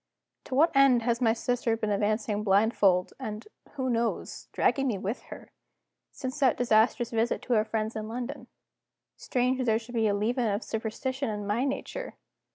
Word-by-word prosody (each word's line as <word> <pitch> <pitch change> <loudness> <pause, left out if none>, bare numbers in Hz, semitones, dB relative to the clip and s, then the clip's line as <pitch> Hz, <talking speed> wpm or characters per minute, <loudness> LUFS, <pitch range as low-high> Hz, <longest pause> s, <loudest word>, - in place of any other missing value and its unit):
To 260 - -4
what 310 +2 +4
end 270 -4 +5
has 235 +1 0
my 230 -2 +4
sister 230 0 0
been 215 -2 -2
advancing 210 +1 0
blindfold, 195 -2 +3
and 215 -4 -6 0.3
(who 265 -3 -2
knows?) 235 -2 -2
dragging 275 -1 +1
me 225 -6 0
with 200 +5 -4
her, - - -10 0.6
since 260 +2 -5
that 265 -4 +3
disastrous 235 +1 +2
visit 230 +1 0
to 250 - -1
our 215 -1 +3
friends 220 0 -2
in 215 0 -4
London? 245 +4 -5 0.7
Strange 255 +1 0
that 255 - 0
there 220 -2 +3
should 235 +2 -9
be 225 -2 +2
a 200 - +1
leaven 235 +4 0
of 205 +2 -1
superstition 260 +4 -3
in 210 -1 -4
my 215 +6 0
nature! - - -4
230 Hz, 175 wpm, -28 LUFS, 215-255 Hz, 0.7 s, end